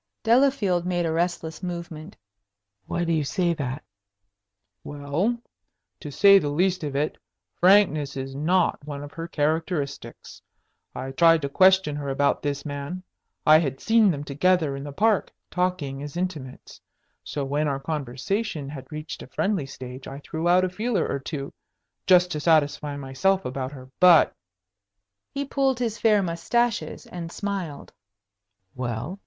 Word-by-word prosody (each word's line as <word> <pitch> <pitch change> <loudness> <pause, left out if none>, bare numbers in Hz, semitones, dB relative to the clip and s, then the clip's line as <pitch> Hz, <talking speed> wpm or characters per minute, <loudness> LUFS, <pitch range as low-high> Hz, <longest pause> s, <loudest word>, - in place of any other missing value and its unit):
Delafield 230 -7 +3
made 175 -1 -1
a 165 - 0
restless 165 -1 -2
movement. 170 -1 -6 0.7
"Why 175 - -1
do 165 -1 0
you 155 -2 +1
say 175 +4 0
that?" 140 -2 -4 1.0
"Well, 145 +11 -1 0.6
to 150 - -7
say 200 +7 +7
the 145 - -2
least 180 +4 +1
of 145 -2 -4
it, 150 +2 -1 0.4
frankness 170 -7 +4
is 135 0 -5
not 165 +4 +1
one 145 -1 -6
of 145 - -9
her 165 +2 -6
characteristics. 155 -1 -3 0.5
I 135 - -5
tried 165 +2 +4
to 140 - -1
question 185 -1 +4
her 140 -1 -4
about 140 +1 +1
this 140 -1 -3
man. 145 +5 -5 0.4
I 155 +1 +8
had 135 -5 -2
seen 225 -2 +4
them 145 -5 -2
together 150 +1 +1
in 135 - -6
the 145 - -6
Park, 210 +7 +1 0.2
talking 180 -7 -1
as 145 +3 -7
intimates. 160 -8 -5 0.4
So, 145 -2 -4
when 145 +3 0
our 140 -1 -1
conversation 150 - -3
had 135 -1 -9
reached 155 0 -6
a - - -9
friendly 190 -9 -1
stage, 130 -1 -9
I 135 - -7
threw 160 +3 -3
out 180 +1 +5
a - - -2
feeler 210 0 -1
or 140 - -2
two, 140 0 -6 0.5
just 180 -1 +5
to 150 - -2
satisfy 150 -2 +2
myself 145 +8 0
about 130 +1 -4
her. 130 -1 -12
But 180 -3 +7 0.5
" 100 0 -59
He 280 0 -1
pulled 270 -2 +1
his 230 -3 -2
fair 210 -3 +4
mustaches 225 +7 -1
and 170 -2 -7
smiled. 190 -8 -5 0.8
"Well?" 125 - -4
160 Hz, 155 wpm, -25 LUFS, 140-185 Hz, 1.0 s, I